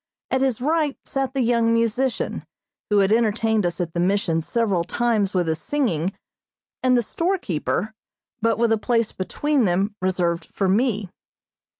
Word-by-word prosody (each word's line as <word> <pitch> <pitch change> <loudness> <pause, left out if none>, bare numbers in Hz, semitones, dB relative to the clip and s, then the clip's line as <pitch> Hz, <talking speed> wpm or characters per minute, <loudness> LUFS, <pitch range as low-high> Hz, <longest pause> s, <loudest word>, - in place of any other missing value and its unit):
At 260 - +1
his 260 -4 0
right 300 0 +1
sat 270 0 -2
the 270 - +1
young 230 -1 +2
musician, 230 +2 0 0.5
who 210 - +3
had 195 0 +3
entertained 220 -3 +2
us 175 +1 -4
at 170 -2 -3
the 170 - -2
Mission 175 -3 +1
several 200 -1 0
times 210 0 0
with 175 -2 +1
his 160 0 -1
singing, 195 - 0 0.7
and 255 -1 +4
the 240 - +2
storekeeper, 220 - -1 0.5
but 225 0 +2
with 230 0 +2
a 225 - +2
place 230 -1 +1
between 280 +7 0
them 195 +3 +1
reserved 180 -2 0
for 195 - 0
me. 205 -2 +1
220 Hz, 160 wpm, -23 LUFS, 185-245 Hz, 0.7 s, and